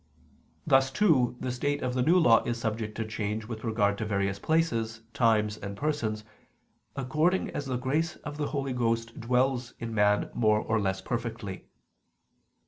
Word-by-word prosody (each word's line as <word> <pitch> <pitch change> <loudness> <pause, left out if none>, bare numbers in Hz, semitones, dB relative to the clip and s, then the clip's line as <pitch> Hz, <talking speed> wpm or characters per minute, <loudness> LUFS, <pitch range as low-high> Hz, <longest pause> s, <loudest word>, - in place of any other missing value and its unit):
Thus, 135 -2 +4
too, 135 - +2
the 130 - -2
state 145 +3 -1
of 125 -1 -1
the 125 - 0
New 165 +8 +4
Law 115 -10 +6
is 120 0 -2
subject 110 -1 -3
to 110 - -2
change 110 0 -3
with 110 -1 -7
regard 105 -3 +1
to - - -1
various 100 -1 -1
places, 115 -9 0
times, 110 -5 +2
and 100 -1 -7
persons, 115 -8 -1 0.7
according 155 +7 +1
as 145 - -4
the 130 -2 -1
grace 150 +7 -1
of 150 0 -8
the 150 -1 -1
Holy 135 -3 -2
Ghost 115 -1 -1
dwells 125 +1 0
in 115 -1 -5
man 105 -1 +2
more 110 -2 +3
or 110 0 0
less 95 -1 -1
perfectly. 115 -5 -4
115 Hz, 165 wpm, -28 LUFS, 110-135 Hz, 0.7 s, Law